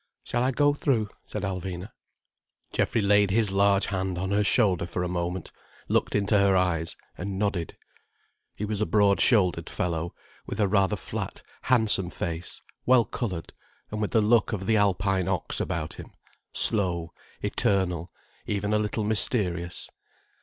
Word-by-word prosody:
"Shall 120 - -1
I 130 - +2
go 145 +2 +2
through?" 120 -7 0 0.2
said - - -5
Alvina. 95 0 -4 0.8
Geoffrey 115 - +1
laid 100 0 +4
his 105 0 +2
large 100 0 +3
hand 95 -2 -2
on 95 +2 -3
her 105 +1 +2
shoulder 100 -5 +3
for 90 0 -3
a - - -1
moment, 90 0 -3 0.4
looked - - 0
into 105 0 +2
her 100 -1 +4
eyes, 85 -3 0 0.2
and 95 +1 -4
nodded. 100 -5 -2 0.8
He 105 - -4
was 105 0 -3
a 110 - +1
broad 100 -2 +3
shouldered 90 -8 +3
fellow, 85 -1 -3 0.3
with - - -5
a 105 - +3
rather 95 -2 +2
flat, - - -6 0.2
handsome 110 -7 +2
face, 85 -1 -5 0.2
well 125 -2 +5
coloured, 95 -9 -5 0.4
and 105 0 -3
with 105 - 0
the 110 - +3
look 110 +1 +3
of 95 -2 -3
the 110 - +2
Alpine 95 -2 +1
ox - - -1
about 80 -1 -3
him, - - -11 0.4
slow, 85 -6 +4 0.3
eternal, 90 -3 0 0.4
even 105 0 -1
a 105 - +3
little 105 +1 -2
mysterious. 95 -5 +1
100 Hz, 155 wpm, -26 LUFS, 90-105 Hz, 0.8 s, well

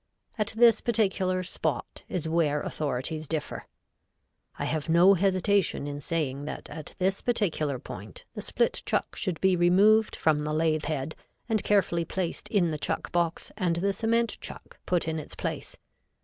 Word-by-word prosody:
At 215 -1 -1
this 235 -1 +6
particular 190 -5 +1
spot 180 - -3
is 170 -3 -2
where 155 -3 +1
authorities 155 +2 -3
differ. 155 0 -4 0.9
I - - -2
have 155 +1 -2
no 175 +4 +7
hesitation 195 -3 +2
in 145 0 -5
saying 145 -3 -2
that - - -6
at 155 - -6
this 190 +1 0
particular 165 - 0
point 100 -4 -9
the - - -5
split - - 0
chuck - - -1
should 180 -3 -2
be 190 -1 +4
removed 200 +5 +4
from 155 -2 +2
the 150 0 -2
lathe 155 0 +1
head 155 0 -2 0.3
and 225 -3 +1
carefully 180 -4 +2
placed 175 +1 -3
in 180 -6 +2
the 155 - -3
chuck - - -2
box 170 -1 0
and 180 -5 0
the 195 +4 0
cement 230 +3 +1
chuck - - -8
put 175 -3 +1
in 160 0 -1
its 150 - -8
place. - - -4
170 Hz, 165 wpm, -28 LUFS, 155-195 Hz, 0.9 s, no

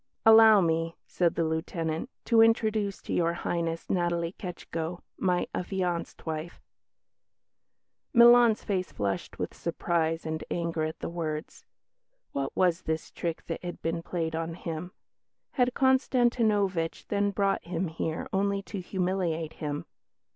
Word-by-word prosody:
"Allow 220 -2 +8
me," 165 -1 0
said 175 -2 +1
the 165 - +1
Lieutenant, 160 +4 -2 0.2
"to 230 -2 +5
introduce 220 -3 +2
to - - -4
Your 170 -1 +2
Highness 165 -1 -2
Natalie 175 -1 0
Ketschko, 175 -2 -5 0.2
my 180 -2 +1
affianced 180 -2 -3
wife." 160 +1 -4 1.5
Milan's 235 -2 +7
face 185 -3 -2
flushed 100 -2 -3
with - - -3
surprise 165 -1 -1
and 160 0 -3
anger 165 -2 -1
at 160 +1 -6
the - - -3
words. 160 -2 -5 0.7
What 135 -1 -3
was 180 -1 +2
this 160 0 -3
trick 170 -2 -4
that 165 - -5
had 175 0 -5
been 165 +1 -1
played 165 -2 -3
on 165 0 -3
him? 165 +1 -5 0.6
Had 250 -1 +1
Konstantinovitch 235 - +2
then 205 0 +1
brought 200 0 +1
him 175 +1 -2
here 160 0 -3
only 200 0 +1
to 200 -1 -6
humiliate 180 -4 -1
him? 145 -1 -3
175 Hz, 135 wpm, -28 LUFS, 165-200 Hz, 1.5 s, Allow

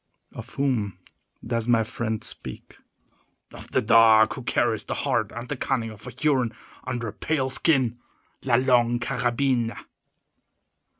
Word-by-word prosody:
"Of - - -10
whom 115 -9 0 0.5
does 115 -1 -1
my 115 -2 +4
friend 110 -2 -3
speak?" 65 - -7 0.8
"Of - - -11
the - - +1
dog 110 0 +6
who 130 - -7
carries 115 -3 0
the - - -3
heart 120 -7 0
and 120 +1 -7
cunning 115 -5 -1
of 105 -1 -12
a - - -4
Huron 130 -7 0 0.3
under 120 -2 -3
a - - -9
pale 135 -4 -1
skin—La 130 -3 -1
Longue 120 -2 +3
Carabine." 120 -1 0
120 Hz, 130 wpm, -25 LUFS, 115-130 Hz, 0.8 s, dog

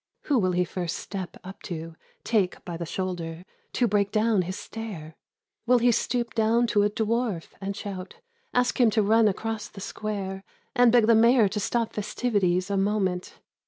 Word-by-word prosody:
Who 280 -4 +2
will 185 -3 +1
he 180 0 +2
first 175 -1 -3
step 190 -3 -6
up 190 +1 -10
to. 165 -1 -6 0.3
Take 205 -6 0
by 175 - -5
the 170 0 -5
shoulder, 175 -2 -4 0.3
To 245 - +2
break 200 -2 +1
down 215 -2 +2
his 185 +2 -4
stare? 185 -9 -7 0.5
Will 250 - +6
he 240 +1 +4
stoop 235 0 -1
down 225 +2 +3
to 205 - +4
a 205 - +3
dwarf 220 -4 -1
and 195 0 -3
shout. 195 -2 -6 0.4
Ask 250 +1 +1
him 235 - +6
to 215 - +5
run 220 +2 +4
across 215 +1 -2
the 200 - -12
square 195 -1 -4 0.3
And 245 -2 +6
beg 240 -2 +5
the 230 - +5
Mayor 230 0 +5
to 210 - -3
stop 230 +2 -1
festivities 200 -4 0
a 200 - +1
moment 195 -2 -1
205 Hz, 180 wpm, -26 LUFS, 185-225 Hz, 0.5 s, Will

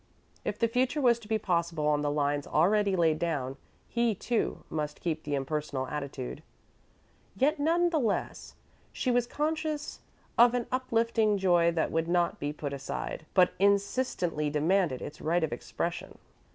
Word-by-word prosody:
If - - -3
the 230 - +2
future 255 +5 0
was 240 -4 +4
to 220 - -14
be 220 0 +1
possible 170 -6 -1
on 150 -1 +2
the 145 - 0
lines 145 -1 0
already 200 +5 +3
laid 160 -3 +2
down, 140 -6 -2 0.3
he, 235 -2 +1
too, 235 +4 -1
must 150 -1 -4
keep 160 -2 -2
the 145 -2 -2
impersonal 140 -1 -2
attitude. 140 -1 -5 0.9
Yet, 295 +4 +2
none 340 +4 +2
the 320 - +2
less, 225 -6 -2 0.4
she 255 - -1
was 240 -1 +2
conscious 305 +1 -2 0.4
of 240 +1 +7
an 245 -2 -1
uplifting 230 -4 +1
joy 175 -3 +3
that 165 - 0
would 165 0 0
not 175 0 +1
be 145 - -2
put 145 -1 -5
aside, 140 +3 -5
but 180 -2 +5
insistently 200 - +1
demanded 155 -1 +1
its 150 - -8
right 170 +2 +1
of 155 - -1
expression. 120 - -4
175 Hz, 160 wpm, -29 LUFS, 150-235 Hz, 0.9 s, of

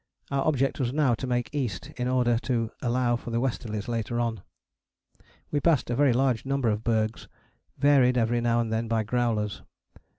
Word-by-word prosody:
Our 140 +1 0
object 135 -3 +1
was 125 -3 0
now 140 -3 +2
to 125 +3 -3
make 120 -3 -1
east 125 -10 -3
in 125 0 -2
order 125 -2 +2
to 115 -3 -1
allow 120 0 +1
for 120 - -6
the 115 0 0
westerlies 110 -5 -3
later 120 0 -2
on. 115 -4 -1 1.1
We 145 - +1
passed 145 -6 +2
a - - 0
very 140 0 +4
large 125 -1 +1
number 135 -3 0
of 105 +1 -1
bergs, 110 -1 -1 0.5
varied 135 -3 +4
every 120 0 +1
now 120 0 +2
and 115 -1 -2
then 115 +1 -1
by 115 -1 +1
growlers. 115 -3 -1
120 Hz, 185 wpm, -27 LUFS, 115-130 Hz, 1.1 s, very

